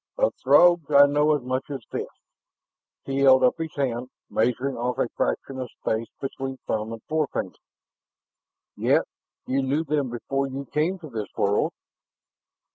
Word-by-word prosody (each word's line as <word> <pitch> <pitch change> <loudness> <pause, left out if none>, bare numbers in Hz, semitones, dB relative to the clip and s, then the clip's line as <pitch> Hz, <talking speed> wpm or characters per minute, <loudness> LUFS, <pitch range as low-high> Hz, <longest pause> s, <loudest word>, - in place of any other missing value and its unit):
"Of - - +2
Throgs 175 -4 +5
I 140 -1 +8
know 150 +1 +3
as 145 - -4
much 130 +2 -2
as 135 -5 -6
this...." - - -3 1.0
He 135 0 -2
held 130 -1 +6
up 125 - +3
his 160 -1 -4
hand, 125 -3 -2 0.2
measuring 125 +4 0
off 125 +1 -2
a - - +1
fraction 135 -1 -2
of 125 -2 -4
space 110 +1 -1
between 135 -1 -4
thumb 110 +1 -2
and 115 -1 -8
forefinger. 155 -2 -1 1.2
"Yet - - +3 0.4
you 135 +1 0
knew 140 +4 0
them 145 -4 -1
before 135 +3 -2
you 135 +1 -6
came 155 +8 0
to 160 -4 -10
this 110 -3 -4
world." 100 +1 +2
135 Hz, 155 wpm, -25 LUFS, 125-150 Hz, 1.2 s, I